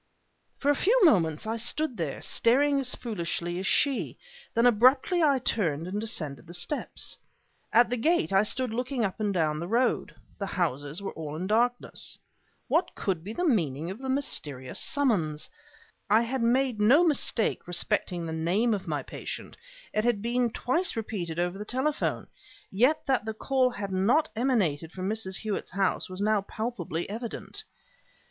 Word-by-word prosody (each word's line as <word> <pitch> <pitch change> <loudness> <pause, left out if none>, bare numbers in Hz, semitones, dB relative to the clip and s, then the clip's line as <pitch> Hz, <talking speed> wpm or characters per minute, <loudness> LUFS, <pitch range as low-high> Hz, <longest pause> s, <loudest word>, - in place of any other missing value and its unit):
For 285 - +2
a - - +2
few 450 - +3
moments 165 - +3
I 225 +1 -2
stood 255 +4 +1
there, 160 -7 -4
staring 275 +4 +3
as 255 -2 +2
foolishly 175 -5 -3
as 190 - -3
she; 280 -3 +1 0.4
then 230 +1 +3
abruptly 255 - +4
I 285 -4 +4
turned 170 - -1
and 200 +3 -3
descended 160 -8 -3
the 175 - -4
steps. 175 +12 -2 0.5
At 240 +1 +5
the 245 - 0
gate 325 - +1
I 195 - +6
stood 245 +2 0
looking 250 0 -1
up 195 +2 -4
and 210 -1 0
down 155 -5 0
the 170 - -4
road. 240 +5 0 0.2
The 200 - -2
houses 155 -1 -2
were 195 - -3
all 155 -2 -6
in 175 +4 -3
darkness. 240 +4 0 0.5
What - - +1
could 185 -6 -2
be 200 - -6
the 355 +11 -2
meaning 165 - 0
of 200 - -8
the 265 0 -5
mysterious 145 - -1
summons? 200 - +1 0.6
I 220 +2 +5
had 255 +2 -2
made 245 -1 +2
no 265 +11 +6
mistake 280 - +1
respecting 175 0 0
the 160 - -4
name 185 +9 +1
of 200 -3 -4
my - - -2
patient; - - -7 0.4
it 215 - +1
had 240 -3 +2
been 240 +1 +1
twice 295 +11 0
repeated 195 -7 -4
over 175 +2 -1
the - - -4
telephone; 265 +7 -1 0.5
yet 250 +10 +2
that 265 -5 +1
the 220 -1 -4
call 260 +2 +2
had 205 -5 -5
not 230 +12 +2
emanated 195 - 0
from 185 0 -4
Mrs. 210 -3 0
Hewett's 215 -2 -3
house 195 0 0
was 185 +1 -5
now 215 -1 +2
palpably 195 -6 -4
evident. 225 +3 -3
215 Hz, 170 wpm, -28 LUFS, 175-250 Hz, 0.6 s, I